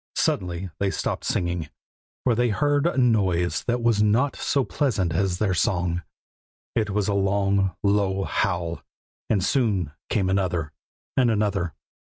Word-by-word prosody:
Suddenly 90 0 -1
they 100 - +1
stopped - - -2
singing, 85 -3 -1 0.5
for 125 - +3
they 120 +1 +2
heard 145 +6 +2
a 170 - -1
noise 95 -9 +2
that 120 -1 0
was 115 -3 +3
not 115 +7 +2
so 140 - 0
pleasant 105 - 0
as 90 +1 0
their 100 -1 +1
song; 90 0 0 0.7
it 110 -2 0
was 105 -1 0
a 105 - +1
long, 100 -1 +1
low 100 -1 +2
howl, 85 -5 -1 0.5
and 100 -4 +2
soon 100 - +1 0.2
came 100 -4 +1
another, 90 -5 0 0.4
and 125 -2 +4
another. 105 -6 0
100 Hz, 145 wpm, -24 LUFS, 90-110 Hz, 0.7 s, and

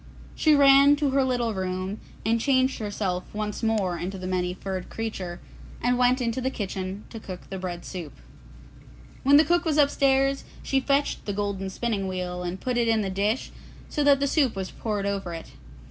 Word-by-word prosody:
She 310 -1 +4
ran 280 0 +7
to 290 -2 0
her 270 0 +3
little 245 -3 0
room 185 +1 -3 0.3
and 225 +1 +2
changed 260 0 +2
herself 200 -4 -2
once 210 -1 -3
more 210 -6 0
into 190 +2 -4
the 185 - -7
Many 180 -1 0
furred 190 -1 -5
Creature, 190 -6 -5 0.4
and 245 +1 +2
went 250 +1 +3
into 245 +1 -1
the 260 - 0
kitchen 195 -3 -4
to 225 - -7
cook 185 -3 -9
the 190 - -4
bread 175 -2 -5
soup. 170 -6 -6 1.1
When 280 +2 +6
the 310 - +6
cook 345 +3 +2
was 315 -3 0
upstairs, 275 -1 +3 0.2
she 270 - +1
fetched 280 +2 0
the 205 - -2
golden 200 -1 -2
spinning 200 -1 -2
wheel 180 -1 -3
and 180 +1 -4
put 250 -1 -2
it 235 -1 +2
in 225 -1 +3
the 195 - -2
dish 205 +6 -1 0.4
so 295 - 0
that 285 -1 +5
the 280 - +1
soup 275 -5 +2
was 190 -1 -4
poured 210 -3 -3
over 195 -4 -2
it. 165 - -9
215 Hz, 190 wpm, -26 LUFS, 190-265 Hz, 1.1 s, ran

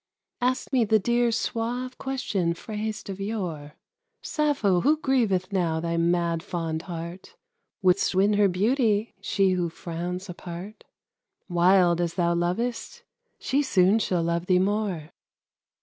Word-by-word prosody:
Ask 255 +2 -1
me 250 -3 +4
the 220 0 +4
dear 235 +3 +1
suave 240 +3 -2
question 205 -11 -1
phrased 215 +3 -5
of 195 -1 -6
yore; 175 -9 -4 0.5
"Sappho, 275 - +1
who 300 +4 +3
grieveth 215 - +1
now 170 -4 +1
thy 170 0 -2
mad 170 0 +1
fond 165 -2 -3
heart? 170 +1 -8 0.5
Wouldst 180 0 +3
win 200 +3 +4
her 205 -1 +4
beauty, 215 +3 +1
she 195 -1 +2
who 175 -2 0
frowns 175 +3 -5
apart? 180 +3 -8 0.6
Wild 175 -1 +4
as 170 -1 -2
thou 170 -2 +2
lovest, 230 - -2 0.3
she 275 +2 0
soon 200 -5 +3
shall 180 -5 0
love 170 +1 -1
thee 185 - +4
more." 190 -5 -1
190 Hz, 135 wpm, -26 LUFS, 170-225 Hz, 0.6 s, me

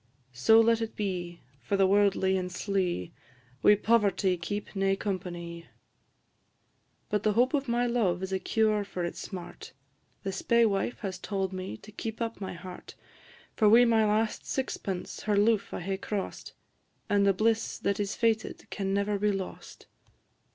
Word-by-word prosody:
So 175 - +5
let 230 0 +4
it 225 - -4
be; 180 -4 -4 0.2
for 200 - -1
the 195 - +5
worldly 195 -1 +3
and 180 -1 -2
slie 180 - -2 0.5
Wi' 210 - +7
poverty 205 -3 +2
keep 205 +5 -5
nae 195 0 +2
companie. 175 -4 -5 1.4
But 210 - 0
the 215 -1 +2
hope 245 +6 +3
of 280 -2 0
my 240 +1 +1
love 205 -7 +1
is 190 0 -3
a 190 - +1
cure 215 0 +1
for 185 -3 -4
its 170 - -5
smart; 180 -3 -8 0.5
The 195 - -2
spaewife 230 +1 +1
has 190 -4 -4
tauld 195 -1 -2
me 185 - -5
to 215 - -14
keep 220 +1 -6
up 230 -2 -3
my 190 - -4
heart; 180 +1 -10 0.6
For 215 -2 +4
wi' 235 +3 +7
my 225 -2 +4
last 215 +1 0
sixpence 195 -8 -3
her 210 -1 +1
loof 210 -1 +2
I - - -4
hae 190 +2 -2
cross'd, 200 0 -5 0.5
And 205 -1 +3
the 200 - +5
bliss 220 +3 0
that 200 0 -1
is 200 -1 -1
fated 225 -2 0
can 195 -1 -1
never 200 0 0
be 210 +1 +2
lost. 195 -2 -6
200 Hz, 165 wpm, -29 LUFS, 190-220 Hz, 1.4 s, Wi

